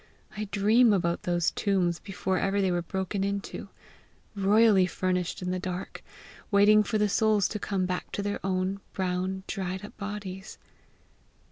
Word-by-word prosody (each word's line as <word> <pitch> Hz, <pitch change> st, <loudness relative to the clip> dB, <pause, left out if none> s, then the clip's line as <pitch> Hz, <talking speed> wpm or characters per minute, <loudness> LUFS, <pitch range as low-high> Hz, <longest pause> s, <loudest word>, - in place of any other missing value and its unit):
I 215 Hz, 0 st, -3 dB
dream 215 Hz, +3 st, +4 dB
about 170 Hz, -3 st, 0 dB
those 175 Hz, -1 st, +1 dB
tombs 180 Hz, -4 st, 0 dB
before 190 Hz, -1 st, -2 dB
ever 195 Hz, +1 st, 0 dB
they 190 Hz, -2 st, +2 dB
were 175 Hz, 0 st, 0 dB
broken 190 Hz, +3 st, -3 dB
into 200 Hz, 0 st, -4 dB, 0.7 s
royally 200 Hz, -1 st, +4 dB
furnished 180 Hz, 0 st, -2 dB
in 180 Hz, -, -2 dB
the 185 Hz, -, -1 dB
dark, 180 Hz, 0 st, -5 dB, 0.5 s
waiting 210 Hz, +1 st, +6 dB
for 215 Hz, +1 st, -1 dB
the 210 Hz, 0 st, +2 dB
souls 210 Hz, -2 st, +2 dB
to 210 Hz, -, -4 dB
come 195 Hz, -2 st, -1 dB
back 180 Hz, 0 st, -4 dB
to 200 Hz, -, -2 dB
their 205 Hz, 0 st, -3 dB
old, 190 Hz, +1 st, -1 dB
brown, 185 Hz, 0 st, -2 dB
dried 190 Hz, -1 st, -4 dB
up -, -, -12 dB
bodies!" 200 Hz, -2 st, -6 dB
195 Hz, 155 wpm, -28 LUFS, 185-205 Hz, 0.7 s, waiting